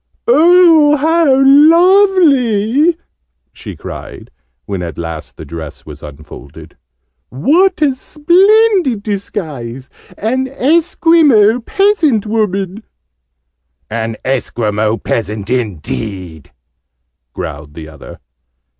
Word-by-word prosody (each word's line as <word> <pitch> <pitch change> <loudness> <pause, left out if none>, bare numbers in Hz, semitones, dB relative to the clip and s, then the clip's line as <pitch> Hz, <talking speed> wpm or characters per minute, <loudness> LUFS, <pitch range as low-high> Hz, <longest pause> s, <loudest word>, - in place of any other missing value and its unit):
"Oh, 335 -7 +4
how 320 +2 +1 0.2
lovely!" 305 - +3 0.6
she - - -10
cried, - - -10 0.3
when 100 -3 -5
at 85 -4 -7
last 80 -2 -8
the - - -10
dress 80 -3 -10
was 75 -1 -12
unfolded. 75 +1 -13 0.5
"What 335 - +1
a 280 -3 +2
splendid 350 - +1
disguise! 155 - -6 0.3
An 260 +5 -2
Esquimaux 280 -5 +2
peasant 325 - 0
woman!" 210 -2 -2 1.1
"An 115 0 -4
Esquimaux 110 -4 -2
peasant, 110 -1 -4
indeed!" 90 - -5 0.8
growled 75 -1 -8
the 80 -1 -9
other. 80 - -13
220 Hz, 85 wpm, -13 LUFS, -, 1.1 s, Oh